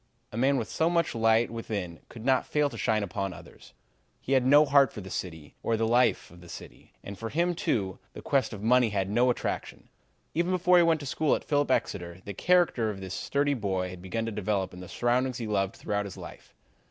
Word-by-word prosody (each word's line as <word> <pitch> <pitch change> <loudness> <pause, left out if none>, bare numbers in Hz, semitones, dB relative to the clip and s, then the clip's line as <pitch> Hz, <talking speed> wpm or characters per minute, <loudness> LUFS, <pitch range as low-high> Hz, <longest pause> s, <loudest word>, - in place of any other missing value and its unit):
A - - -9
man 135 +4 +2
with 115 - -2
so 160 +1 +1
much 170 -1 +1
light 115 0 +3
within 100 -7 -5
could 115 -1 -10
not 130 -1 +2
fail 150 -1 +1
to - - -9
shine 110 +1 +1
upon 95 0 -3
others. - - -15 0.4
He - - -7
had 130 -2 +4
no 145 +4 +6
heart 140 -3 +4
for - - -8
the 95 -1 -9
city 80 -5 -6
or 115 - 0
the 110 0 +1
life 120 +2 +2
of 85 0 -15
the 85 - -14
city, - - -11
and 100 -1 -8
for 115 - -4
him, 170 +6 +1
too, 95 - -1
the - - -9
quest 135 -4 +1
of 105 -2 -8
money 125 +1 +4
had 100 -1 -1
no 120 +4 +3
attraction. 125 - -3 0.4
Even 170 +2 0
before 180 0 +4
he 175 - +6
went 165 -2 +2
to - - -7
school 145 +2 +1
at - - -5
Phillips 145 -1 +1
Exeter, 90 -8 -1
the 100 - -5
character 170 - +2
of 100 -2 -5
this 95 -1 -6
sturdy 145 +6 0
boy 95 -6 -2
had 90 -1 -10
begun 105 +5 -3
to 115 - -3
develop 100 -2 -2
in 90 - -10
the 90 - -9
surroundings 125 +1 0
he 115 - -4
loved 100 -3 -1
throughout 105 0 -2
his 95 - -8
life. - - -11
115 Hz, 230 wpm, -28 LUFS, 95-140 Hz, 0.4 s, no